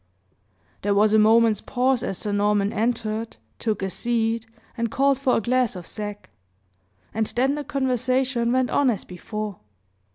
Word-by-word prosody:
There 200 0 +1
was 210 +1 +4
a 220 - +6
moment's 220 0 +4
pause, 255 0 +1
as 195 - -3
Sir 210 - -2
Norman 205 0 +1
entered, 225 0 -2 0.2
took 215 -3 -1
a 190 - -1
seat, 230 +1 0 0.3
and 230 -2 -1
called 275 +2 +2
for 270 -2 +2
a - - 0
glass 250 0 +1
of 180 -2 -7
sack, 205 - -7 0.8
and 220 0 0
then 265 +3 +2
the 295 0 -3
conversation 255 -3 0
went 255 0 +1
on 280 -2 +3
as 215 -6 -1
before. 210 +2 -6
230 Hz, 160 wpm, -24 LUFS, 210-255 Hz, 0.8 s, a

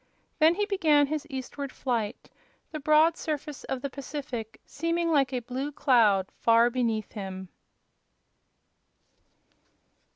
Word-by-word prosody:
Then 320 +2 +5
he 415 +2 0
began 320 -8 +3
his 305 +1 -4
eastward 270 0 -6
flight, 235 -3 -3 0.4
the 310 - -5
broad 310 +3 +4
surface 300 -3 -5
of 265 0 -4
the 280 - -2
Pacific 265 -5 -6
seeming 335 +1 -1
like 275 -4 +3
a 250 -2 -2
blue 260 +5 -4
cloud 220 -9 +3
far 230 +1 +4
beneath 230 -4 -1
him. 190 -3 -7
275 Hz, 120 wpm, -27 LUFS, 235-305 Hz, 0.4 s, Then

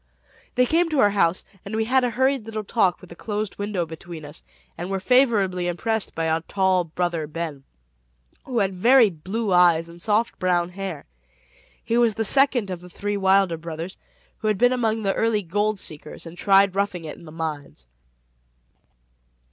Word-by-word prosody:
They 250 0 +4
came 330 +5 +2
to 305 -3 0
our 205 -5 +5
house, 185 -3 +1 0.2
and 200 +2 -6
we 220 0 0
had 260 +2 +2
a 245 - +2
hurried 260 -1 0
little 215 -1 -4
talk 195 -3 +1
with 180 - -14
a - - -9
closed 210 +1 -4
window 205 -4 -2
between 160 0 -9
us, 145 - -9 0.3
and 175 +2 -6
were 195 0 -1
favorably 200 -7 +2
impressed 220 +5 -2
by 165 0 -1
our 160 0 +1
tall 185 0 +1
"Brother 170 -1 -2
Ben," 150 -3 -6 0.8
who 255 -3 -4
had 195 -3 +1
very 230 +3 +5
blue 190 +6 -3
eyes 170 -2 +4
and 170 +1 -13
soft 215 +4 0
brown 175 -1 +1
hair. 185 -4 -6 0.8
He 235 0 +1
was 230 -3 +3
the 225 - -1
second 255 -4 +3
of 175 -1 -5
the 180 - -12
three 205 +3 -3
Wilder 190 -3 +3
brothers, 165 +2 -6 0.4
who 215 - -3
had 210 -2 +1
been 245 +4 +4
among 225 -3 0
the 195 -1 +1
early 225 -2 +1
gold 205 +4 0
seekers, 155 -3 -7
and 165 +1 -9
tried 195 +1 +4
roughing 195 -4 -2
it 155 - -6
in 170 - -15
the 155 - -11
mines. 150 - -6
195 Hz, 185 wpm, -23 LUFS, 170-220 Hz, 0.8 s, our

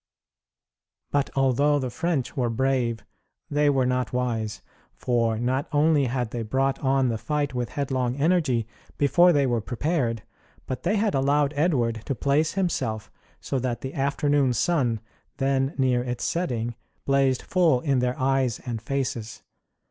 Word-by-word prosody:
But 145 -1 +1
although 135 +2 +3
the 130 -3 -3
French 160 -1 -2
were 125 -3 0
brave 120 -3 0 0.5
they 145 0 +3
were 135 -2 +2
not 125 0 0
wise. 115 -4 -2 0.3
For 115 -2 0
not 130 +6 -1
only 150 -1 +3
had 120 -2 -2
they 120 - -3
brought 135 +5 0
on 135 -1 +2
the 115 -2 -2
fight 145 +4 -1
with 125 -2 -2
headlong 130 -3 -1
energy 140 -6 +1 0.3
before 150 +6 +5
they 145 -4 +3
were 120 -3 0
prepared, 120 -2 -1 0.4
but 130 - -4
they 185 +5 +1
had 210 0 +1
allowed 140 +2 +2
Edward 125 -8 +1
to 135 - -2
place 145 +5 +1
himself 160 - -2 0.3
so 135 - -2
that 120 -2 -2
the 130 - -5
afternoon 140 -1 +1
sun, 120 - +1 0.4
then 135 +1 0
near 130 -2 +2
its 125 -1 -4
setting, 120 -9 -1 0.3
blazed 135 -2 +2
full 170 -8 +3
in 135 -3 +1
their 125 0 0
eyes 130 -3 +1
and 115 -3 -4
faces. 120 -3 -3
130 Hz, 150 wpm, -25 LUFS, 120-145 Hz, 0.5 s, before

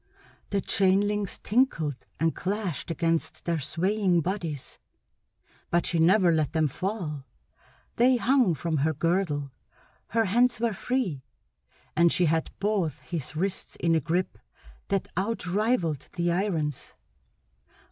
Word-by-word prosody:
The 200 -1 0
chain 190 0 +3
links 205 -2 -2
tinkled 165 - 0
and 165 +1 +1
clashed 190 -6 -3
against 165 0 -1
their 170 -2 0
swaying 180 +5 +1
bodies, 165 -6 -4 0.9
but 175 0 +2
she 170 - 0
never 180 +2 +5
let 155 -3 +1
them 160 -2 +2
fall; 155 - -4 0.7
they 250 +2 +5
hung 245 - +3
from 160 +1 -2
her 155 +3 +1
girdle; 155 -4 0 0.6
her 225 0 +1
hands 240 +4 +3
were 230 -1 +1
free; 200 - -2 0.7
and 170 +1 +5
she 180 - +2
had 160 0 +1
both 195 -8 0
his 155 +1 -5
wrists 190 +4 -3
in 170 -1 +1
a 165 - +4
grip 170 +5 -2 0.5
that 195 -2 0
outrivaled 190 - 0
the 175 -1 0
irons. 170 -6 -2
175 Hz, 125 wpm, -27 LUFS, 160-205 Hz, 0.9 s, never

